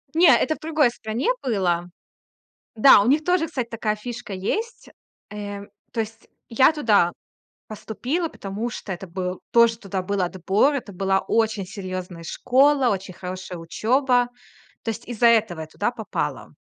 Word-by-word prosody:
Не, 340 +1 +6
это 315 +6 +1
в - - -18
другой 310 -5 +2
стране 230 - -3
было 180 -7 0 0.9
Да, 220 -1 +8
у 210 - 0
них 300 +4 +3
тоже, 360 -2 +2
кстати, 255 -7 -3
такая 215 -2 -1
фишка 235 -1 -7
есть. 435 - -3 0.4
Э, 205 -1 -6 0.3
то 230 - -4
есть 225 +1 -5 0.2
я 260 +6 +5
туда 210 - +3 0.6
поступила, 250 - -3
потому 210 -1 -5
что 200 - -7
это 190 +1 -6
был, 180 +1 -4
тоже 235 -1 +5
туда 195 -4 -4
был 200 +1 -1
отбор. 190 - +1
Это 240 -7 -4
была 195 +1 +1
очень 220 -3 0
серьёзная 185 -3 -6
школа, 265 - +3
очень 190 -2 -3
хорошая 185 0 -7
учёба, 245 +8 +1 0.6
то 225 - -3
есть 225 +1 -5
из-за 235 0 +2
этого 215 -8 +3
я 155 - -7
туда - - -2
попала. - - -4
220 Hz, 155 wpm, -23 LUFS, 190-250 Hz, 0.9 s, Да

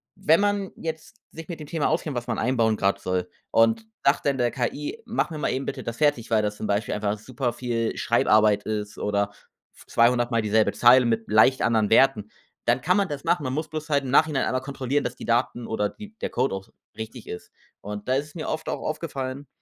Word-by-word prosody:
wenn 170 -4 +3
man 205 -1 0
jetzt 160 +4 -6 0.2
sich 165 0 -9
mit 170 -3 -6
dem 150 - -8
Thema 160 -1 0
auskennt, 155 -3 -1
was 120 0 -4
man 115 - -2
einbauen 115 -2 +2
grad 100 0 +1
soll, 90 -1 -2 0.2
und 115 - +3 0.2
sagt 140 - +3
dann 140 -2 +2
der 120 -1 +1
KI: 145 - -3
„Mach 230 -4 -1
mir 155 - -5
mal 150 - -1
eben 135 +1 -2
bitte - - -4
das 115 0 -5
fertig.‟, 145 -6 +1
weil 110 -1 +4
das 105 0 -2
zum 110 - -4
Beispiel 105 +2 0
einfach 105 0 -1
super 125 +2 -3
viel 115 -2 -2
Schreibarbeit 105 -1 +3
ist 105 -1 -4
oder 100 0 0 0.6
200 120 +1 +3
Mal 115 -1 +2
dieselbe 110 0 +2
Zeile 125 +1 +6
mit 115 -1 0
leicht 110 +5 +4
anderen 110 -2 +2
Werten, 110 -3 +4 0.3
dann - - +2
kann 180 +4 +2
man 200 -1 +2
das 145 -4 -6
machen. 170 -4 +1
Man 130 -2 -2
muss 155 +3 -2
bloß 155 0 -6
halt 140 -2 +2
im 130 - -4
Nachhinein 145 0 +3
einmal 130 0 -1
kontrollieren, 135 +1 -2
dass - - -3
die - - -9
Daten 120 0 0
oder 105 -2 -1
die 210 0 -12
der - - -1
Code 130 -1 0
auch 95 0 -8 0.3
richtig 110 +1 -8
ist. 90 - -8 0.3
Und 105 0 -7
da 130 - +3
ist 145 +4 -3
mir 160 - -5
oft 155 - -3
auch - - -3
aufgefallen, 140 -3 -4
125 Hz, 225 wpm, -25 LUFS, 110-150 Hz, 0.6 s, Zeile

